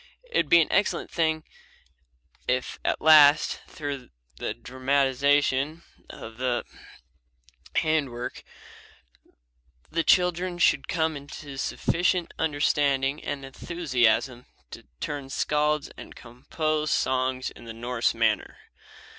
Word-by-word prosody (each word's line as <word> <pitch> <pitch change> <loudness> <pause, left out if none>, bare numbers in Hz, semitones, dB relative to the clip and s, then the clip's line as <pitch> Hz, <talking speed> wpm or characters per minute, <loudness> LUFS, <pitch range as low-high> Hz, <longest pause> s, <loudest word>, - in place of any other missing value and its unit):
It 485 - 0
would - - +1
be 170 - +7
an 155 - -1
excellent 205 - 0
thing 160 -2 0 1.0
if 125 0 -1
at - - -1
last, 155 -1 +6
through 140 -4 -6 0.3
the - - -4
dramatization 140 +3 +1 0.3
and 110 0 -10
the 125 -2 -1 1.1
handwork, 145 -7 -1 1.5
the 165 +1 0
children 180 0 +2
should 175 - +3
come 160 -2 0
into 140 0 -9
sufficient 175 +5 0
understanding 145 -2 +1
and 140 -1 -4
enthusiasm 130 -5 0 0.2
to - - -11
turn 145 -2 -5
skalds 150 +3 0
and - - -11
compose 155 +6 -3
songs 130 -1 0
in 120 - -14
the 115 - -7
Norse 120 +1 -1
manner. - - 0
145 Hz, 105 wpm, -26 LUFS, 130-160 Hz, 1.5 s, be